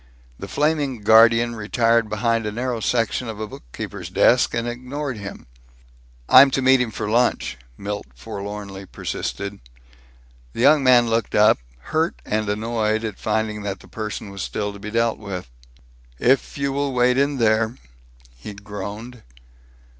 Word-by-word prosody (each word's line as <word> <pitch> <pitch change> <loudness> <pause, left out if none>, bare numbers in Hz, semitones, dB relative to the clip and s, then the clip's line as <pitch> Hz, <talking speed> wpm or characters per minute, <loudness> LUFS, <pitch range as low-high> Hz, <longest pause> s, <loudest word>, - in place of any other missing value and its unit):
The - - -6
flaming 145 -5 0
guardian 115 +2 +5
retired 115 +1 +1
behind 115 +1 0
a - - -2
narrow 120 +1 -2
section 115 +2 0
of 110 -1 -6
a 110 - -3
bookkeeper's - - -8
desk - - +4
and 115 0 -1
ignored 125 +2 -4
him. 100 -1 -8 0.8
"I'm 135 +2 +8
to - - 0
meet 130 0 +5
him 125 - 0
for 110 -1 -4
lunch," 120 +3 +1 0.2
Milt 105 -5 -5
forlornly 100 +6 -7
persisted. 100 +2 -5 0.9
The - - -8
young 145 +2 +5
man 125 -2 +5
looked 115 0 -1
up, 105 - +5 0.3
hurt 160 +2 0
and 105 -1 -1
annoyed 110 +1 -1
at 110 -3 -5
finding 110 -1 -1
that 100 -2 -4
the - - -16
person 105 -2 -6
was 100 -1 -7
still 105 -1 -3
to 100 - -11
be 105 +1 -6
dealt 115 +1 0
with. 95 - -7 0.7
"If 130 - +1
you 140 0 -1
will 140 -1 -1
wait 125 +1 +3
in 140 0 +1
there?" 110 0 +2 0.6
he - - -9
groaned. 105 +4 -8
110 Hz, 155 wpm, -22 LUFS, 105-125 Hz, 0.9 s, I'm